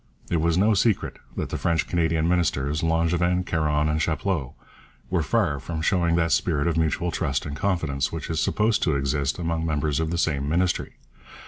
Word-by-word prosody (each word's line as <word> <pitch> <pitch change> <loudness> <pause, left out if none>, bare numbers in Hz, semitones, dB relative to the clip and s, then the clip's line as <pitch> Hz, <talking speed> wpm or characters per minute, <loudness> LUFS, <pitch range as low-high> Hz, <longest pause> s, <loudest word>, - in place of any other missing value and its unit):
It 85 -2 +2
was 85 +1 +2
no 105 +4 +4
secret 105 +1 +1 0.2
that - - -2
the - - -3
French 85 -2 0
Canadian 80 -2 +1
ministers, 75 -4 0
Langevin, 85 +2 +1
Caron, 75 -3 +1
and 75 +1 0
Chapleau, 80 -4 -1 0.6
were 90 -3 +2
far 80 -5 +1
from 80 +4 -5
showing 85 -2 +2
that 85 -1 +1
spirit 75 -5 +1
of 85 - +1
mutual 80 +2 0
trust 70 -5 -1
and 75 -1 -5
confidence 75 -7 -1
which 80 -3 -5
is 80 -1 -2
supposed 105 +5 +1
to 80 -5 +1
exist 70 0 0
among 85 -2 -2
members 75 -2 0
of 80 -1 -1
the 85 - -2
same 70 -4 0
Ministry. 90 +3 0
80 Hz, 185 wpm, -25 LUFS, 75-85 Hz, 0.6 s, no